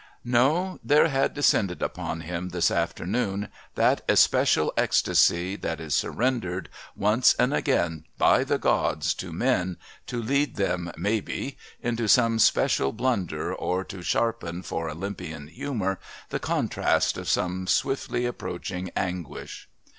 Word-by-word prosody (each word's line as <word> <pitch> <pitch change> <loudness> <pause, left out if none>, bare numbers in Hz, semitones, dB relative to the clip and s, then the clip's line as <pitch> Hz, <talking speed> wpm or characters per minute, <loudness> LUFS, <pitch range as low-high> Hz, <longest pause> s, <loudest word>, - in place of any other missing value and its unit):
No, 145 +10 +2
there 150 +2 +4
had 135 -1 +1
descended 105 -10 +2
upon 85 - -3
him 90 +2 -4
this 85 -1 +1
afternoon 95 +4 -1 0.3
that - - +3
especial - - +4
ecstasy 90 +3 +3
that 80 -4 -3
is 80 -3 -4
surrendered 105 - -1 0.3
once 105 +5 +4
and 125 +3 +2
again 85 - 0
by - - +4
the - - 0
gods 75 +2 +1
to - - -7
men 90 -1 0 0.3
to 120 - -3
lead 140 +5 0
them, 90 -3 -1
maybe, 105 +8 -2 0.3
into 120 -1 -1
some 115 0 +4
especial 70 -9 +3
blunder 115 -6 -1
or 90 +1 -1
to 95 -1 -9
sharpen, 90 -4 -1
for 80 0 -3
Olympian 80 -3 -6
humour, 110 -5 -3 0.3
the - - -2
contrast - - +1
of - - -5
some 90 +1 0
swiftly 135 0 0
approaching 90 -5 -4
anguish. 90 -3 -5
95 Hz, 130 wpm, -26 LUFS, 85-120 Hz, 0.3 s, there